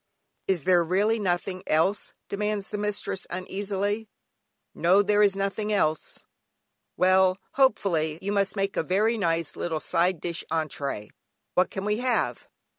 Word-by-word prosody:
"Is 185 -6 0
there 180 -2 +4
really 205 +6 +1
nothing 185 -1 -1
else?" 165 +6 +1
demands 210 0 -2
the 210 - -4
mistress 205 -2 -3
uneasily. 200 +3 -3 0.6
"No, 185 +4 +4
there 205 +1 +3
is 200 -2 +4
nothing 200 +2 -2
else." 155 -7 0 0.7
"Well," 185 0 +4
hopefully, 180 - +2
"you 195 +2 -3
must 200 -1 +1
make 195 -1 -1
a - - +2
very 205 +7 +1
nice 165 -6 0
little 160 -2 -2
side 175 +2 +1
dish 170 +1 -3
(entrée), 140 -9 -3 0.4
what 180 - +3
can 195 0 -5
we 210 0 +1
have?" 250 +1 0
195 Hz, 140 wpm, -26 LUFS, 175-205 Hz, 0.7 s, there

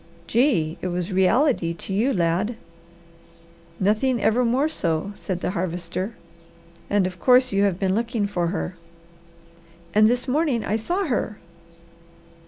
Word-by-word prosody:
"Gee! 185 - +1
It - - -2
was 180 +2 -2
reality 190 - +2
to 190 - -6
you, 230 +8 +2
lad!" 180 +4 0 1.2
"Nothing 220 +6 +2
ever 230 +3 +2
more 250 +5 +2
so," 170 - -1
said 185 -2 -5
the - - -1
Harvester. 185 +3 -3 0.7
"And 205 -2 +2
of 180 -1 -5
course, 255 +5 +4
you 200 +1 +3
have 190 -3 0
been 190 -1 0
looking 230 0 0
for 180 -4 -1
her?" 180 0 -3 1.2
"And 215 +1 +5
this 245 +2 -1
morning 275 -3 +1
I 210 - 0
saw 350 - -1
her!" 235 - -2
205 Hz, 140 wpm, -23 LUFS, 180-245 Hz, 1.2 s, And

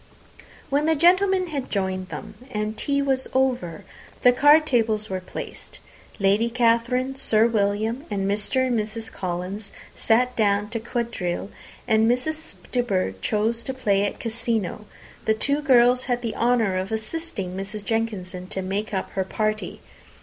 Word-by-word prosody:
When 290 +2 +2
the 320 - +4
gentlemen 370 +3 +4
had 280 -4 -4
joined 190 -2 -2
them, 215 - -7 0.2
and 215 -2 -2
tea 280 +4 0
was 265 -1 0
over, 250 -11 0 0.4
the 250 - +8
card 290 +5 +6
tables 220 -6 +1
were 185 - -1
placed. 185 - -8 0.4
Lady 205 +3 +3
Catherine, 240 +2 +2
Sir 225 -5 +3
William, 220 +4 0
and 200 -2 -1
Mr. 210 +6 +1
and 245 -3 +1
Mrs. 220 +1 -4
Collins 185 +3 -4 0.2
sat 250 +3 +2
down 205 -1 +1
to 230 - -2
quadrille; 225 -6 -3 0.4
and 220 0 +4
as 250 +1 0
Miss 315 +1 -4 0.2
De 250 - +2
Bourgh 185 - -1
chose 220 - 0
to 265 - -5
play 200 -6 +2
at 205 - -2
cassino, 225 -3 -2 0.4
the 220 - +3
two 280 +6 0
girls 250 -3 +5
had 245 -1 -1
the 230 - -3
honour 230 -5 +2
of 190 +2 -4
assisting 220 - -3
Mrs. 195 +2 -5
Jenkinson 195 -5 -2
to 190 0 -4
make 200 +3 -2
up 190 - -3
her 190 - -1
party. 215 +2 -2
225 Hz, 155 wpm, -24 LUFS, 200-250 Hz, 0.4 s, the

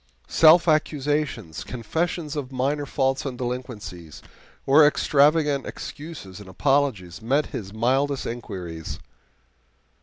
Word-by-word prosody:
Self 165 +2 +6
accusations, 150 - 0
confessions 160 +6 -3
of 140 -3 -4
minor 140 +3 -1
faults 135 -2 0
and 130 -3 -5
delinquencies, 120 - -6 0.4
or 145 +3 +6
extravagant 145 -1 +3
excuses 145 - -8
and 100 -2 -11
apologies 115 -5 0
met 135 +7 +1
his 100 -3 -5
mildest 130 +5 0
inquiries. 90 -9 -6
135 Hz, 100 wpm, -24 LUFS, 110-150 Hz, 0.4 s, Self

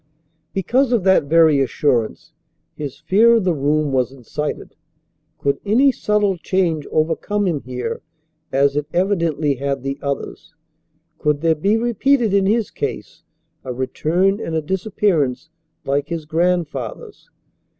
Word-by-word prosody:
Because 245 +8 +1
of 235 -6 +2
that 190 -5 +4
very 160 -1 +4
assurance 130 -4 -1 0.4
his 145 -3 -6
fear 210 +9 +4
of 225 - +2
the 180 -2 +2
room 150 0 0
was 130 -1 +1
incited. 135 +3 -5 0.6
Could 140 0 -1
any 250 +7 +4
subtle 210 -6 0
change 165 -4 0
overcome 170 +6 0
him 165 -6 -1
here 125 0 -5 0.5
as 140 +1 +2
it 150 0 -1
evidently 170 -6 +1
had 140 0 -2
the 135 0 -3
others? 140 +1 -5 0.6
Could 150 -1 0
there 165 -1 +3
be 195 +8 +1
repeated 240 0 +1
in 195 -1 +3
his 220 +1 +1
case - - -5 0.4
a 130 - -5
return 165 - 0
and 165 -6 -4
a 160 - +1
disappearance 165 - -1 0.3
like 140 +1 -1
his 165 -2 -4
grandfather's? 160 -7 -2
160 Hz, 135 wpm, -20 LUFS, 140-195 Hz, 0.6 s, that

